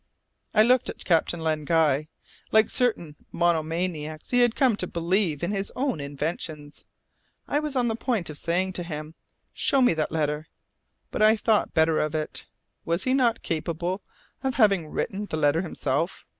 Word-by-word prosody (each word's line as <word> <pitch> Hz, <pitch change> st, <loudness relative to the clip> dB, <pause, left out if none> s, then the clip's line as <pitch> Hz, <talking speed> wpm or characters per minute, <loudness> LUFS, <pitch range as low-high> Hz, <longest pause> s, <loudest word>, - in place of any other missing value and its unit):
I 215 Hz, -, +7 dB
looked 250 Hz, +2 st, +3 dB
at -, -, -7 dB
Captain 170 Hz, 0 st, +2 dB
Len 155 Hz, -1 st, -1 dB
Guy. 155 Hz, -2 st, +2 dB, 0.4 s
Like 220 Hz, 0 st, +4 dB
certain 215 Hz, -, 0 dB, 0.2 s
monomaniacs 165 Hz, -2 st, -1 dB
he 245 Hz, -, +4 dB
had 240 Hz, -2 st, +4 dB
come 255 Hz, -5 st, +3 dB
to 180 Hz, -, -3 dB
believe 170 Hz, -2 st, 0 dB
in 175 Hz, -, 0 dB
his 200 Hz, -1 st, -2 dB
own 260 Hz, -, -1 dB
inventions. 150 Hz, +1 st, -5 dB, 0.6 s
I 290 Hz, -, +1 dB
was 300 Hz, -2 st, -4 dB
on 245 Hz, -2 st, +2 dB
the 225 Hz, -, 0 dB
point 230 Hz, -6 st, -1 dB
of 145 Hz, -, -8 dB
saying 185 Hz, +3 st, 0 dB
to 180 Hz, -, -4 dB
him, 155 Hz, -2 st, -6 dB, 0.4 s
"Show 275 Hz, -, +2 dB
me 250 Hz, -8 st, +5 dB
that 155 Hz, -1 st, -2 dB
letter," 150 Hz, -1 st, -1 dB, 0.6 s
but -, -, -3 dB
I 215 Hz, +1 st, +6 dB
thought 220 Hz, -1 st, +1 dB
better 160 Hz, 0 st, +3 dB
of 155 Hz, +1 st, -1 dB
it. 155 Hz, -1 st, -4 dB, 0.4 s
Was 170 Hz, +2 st, -1 dB
he 255 Hz, -, +1 dB
not 240 Hz, -4 st, +2 dB
capable 170 Hz, +3 st, -2 dB, 0.4 s
of 265 Hz, -2 st, -1 dB
having 200 Hz, -8 st, +3 dB
written 200 Hz, +6 st, -3 dB
the 155 Hz, -, -3 dB
letter 150 Hz, +2 st, +3 dB
himself? 160 Hz, -1 st, -2 dB
170 Hz, 170 wpm, -26 LUFS, 155-220 Hz, 0.6 s, I